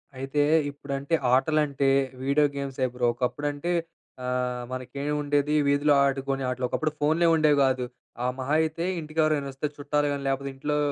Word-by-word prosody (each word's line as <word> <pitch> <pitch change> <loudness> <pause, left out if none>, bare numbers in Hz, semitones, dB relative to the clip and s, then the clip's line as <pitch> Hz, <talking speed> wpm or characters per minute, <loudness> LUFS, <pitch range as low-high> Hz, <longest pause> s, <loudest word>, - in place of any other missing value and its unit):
అయితే, 135 +3 -1 0.3
ఇప్పుడంటే, 140 +1 -5 0.2
ఆటలంటే 140 0 +2 0.3
video 140 +2 +3
గేమ్సే, 135 -2 -2
bro. 125 -1 +1
ఒకప్పుడంటే, 145 +6 -2 0.5
ఆహ్, 125 -1 -1
మనకేం 140 +3 -4
ఉండేది 145 +1 +1
వీధిలో 145 +1 +3
ఆడుకునే 135 0 -1
ఆటలు. 125 0 -2
ఒకప్పుడు 155 +4 -1
ఫోన్‌లే, 160 +3 +3
ఉండేవి 155 -2 +4
గాదు. 130 -1 +1 0.4
ఆహ్, 125 0 0
మహా 130 +3 -1
అయితే 160 +2 -2
ఇంటికి 155 0 -6
ఎవరైనా 150 -3 +1
వస్తే 135 +3 -2
చుట్టాలు 145 0 0
గాని, 140 -1 -3
లేకపోతే 135 0 -1
ఇంట్లో 150 +2 -1
140 Hz, 150 wpm, -26 LUFS, 135-150 Hz, 0.5 s, ఉండేవి